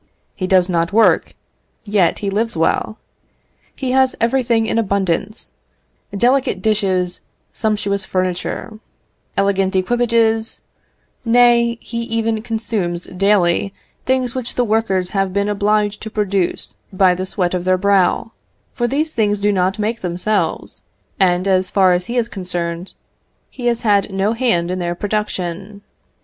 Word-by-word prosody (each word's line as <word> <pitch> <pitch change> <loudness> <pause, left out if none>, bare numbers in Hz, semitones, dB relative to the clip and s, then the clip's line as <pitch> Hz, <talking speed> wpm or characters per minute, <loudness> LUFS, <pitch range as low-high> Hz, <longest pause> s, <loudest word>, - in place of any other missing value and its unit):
He 185 - -3
does 185 -1 +4
not 170 -1 0
work, 220 +2 +3 0.5
yet 205 -4 +2
he 200 - -1
lives 220 0 -1
well; 165 +6 0 0.8
he 260 -2 -3
has 260 0 +3
everything 235 -1 +1
in 225 - 0
abundance; 200 0 -1 0.6
delicate 245 0 +1
dishes, 185 -4 0 0.3
sumptuous 205 -3 -1
furniture, 185 +4 -3 0.6
elegant 195 -1 +1
equipages; 225 +2 +1 0.6
nay, 235 0 +4
he 235 0 -5
even 225 -1 -1
consumes, 220 -6 -3
daily, 195 0 +1 0.3
things 255 -2 +1
which 255 -2 -4
the 250 - +2
workers 210 -5 0
have 195 -2 -1
been 200 +1 0
obliged 210 0 0
to 220 - -5
produce 200 -4 -1 0.2
by 185 -1 +4
the 185 +1 -4
sweat 180 -2 -1
of 180 -1 -1
their 185 0 +2
brow, 200 +3 +2 0.4
for 240 - -1
these 305 +5 -1
things 210 -2 +1
do 205 +1 +2
not 190 0 0
make 220 +2 -2
themselves; 180 +4 -2 0.4
and, 180 0 +2
as 185 -1 +2
far 190 -2 +4
as 180 0 0
he 240 +4 -4
is 235 -1 +1
concerned, 180 -3 -4 0.6
he 245 -2 -4
has 235 -1 +1
had 205 -3 +2
no 195 +3 0
hand 205 -8 +1
in 185 - -2
their 175 -1 -2
production. 200 -1 -3
200 Hz, 140 wpm, -18 LUFS, 185-225 Hz, 0.8 s, does